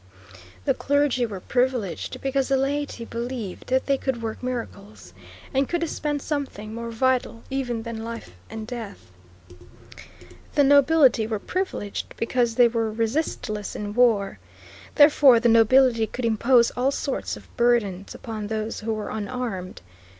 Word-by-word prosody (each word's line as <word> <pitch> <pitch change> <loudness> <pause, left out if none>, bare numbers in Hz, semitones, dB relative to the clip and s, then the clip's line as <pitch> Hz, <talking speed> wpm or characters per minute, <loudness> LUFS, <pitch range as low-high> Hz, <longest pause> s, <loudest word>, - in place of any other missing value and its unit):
The - - +3
clergy 285 -4 +1
were 200 -4 -6
privileged 245 -6 -1
because 270 0 0
the 275 - +2
laity 275 -3 -2
believed 235 -4 -5
that 260 +1 +1
they 275 -1 +1
could 265 -3 -2
work 220 -1 -4
miracles, 230 -5 -6 0.4
and 270 0 +1
could 345 -1 -1
dispense 295 -3 -2
something 265 -8 -4
more 235 0 -5
vital 245 0 0
even 245 -4 -2
than 225 -1 -6
life 230 - -7 0.2
and 220 -1 -6
death. 220 - -8 1.4
The 290 - +5
nobility 280 -4 +5
were 220 -1 -1
privileged 355 - -4
because 235 0 0
they 245 0 +6
were 225 -1 -1
resistless 225 -2 -2
in 205 0 -4
war. 220 -5 +2 0.6
Therefore, 290 -4 +7
the 235 +1 +3
nobility 230 0 +5
could 250 +2 -4
impose 235 +2 +4
all 255 +2 0
sorts 275 -1 -3
of - - -17
burdens 230 -6 +1
upon 215 -2 -6
those 220 +1 -3
who 220 0 -2
were 215 - -5
unarmed. 215 -4 -4
235 Hz, 145 wpm, -24 LUFS, 220-265 Hz, 1.4 s, Therefore